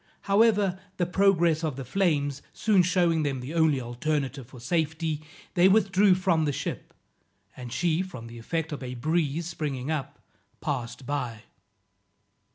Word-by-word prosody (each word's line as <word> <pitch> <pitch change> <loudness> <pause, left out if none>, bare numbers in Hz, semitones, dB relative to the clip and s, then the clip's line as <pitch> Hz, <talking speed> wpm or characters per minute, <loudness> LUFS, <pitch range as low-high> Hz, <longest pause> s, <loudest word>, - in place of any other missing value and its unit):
However, 200 -2 +3 0.2
the 175 - +1
progress 175 -3 +3
of 155 -5 -1
the 135 -1 -6
flames 145 - 0
soon 210 -4 +3
shewing 175 -2 +2
them 140 -3 -1
their 130 +6 -6
only 160 -4 +3
alternative 135 +1 -2
for 130 -1 -13
safety, 160 +2 -1 0.3
they 180 0 +5
withdrew 195 -1 +4
from 175 -4 +2
the 145 - +1
ship, - - -5 0.6
and 125 -2 -8
she 165 +6 +1
from 130 -12 -7
the 115 0 -10
effect 160 +7 -3
of 145 - -5
a 125 -1 -5
breeze 155 +3 0
springing 150 -4 -3
up, 150 -4 -3 0.4
passed 130 -3 -4
by. 125 -6 -3
155 Hz, 150 wpm, -27 LUFS, 135-180 Hz, 0.6 s, they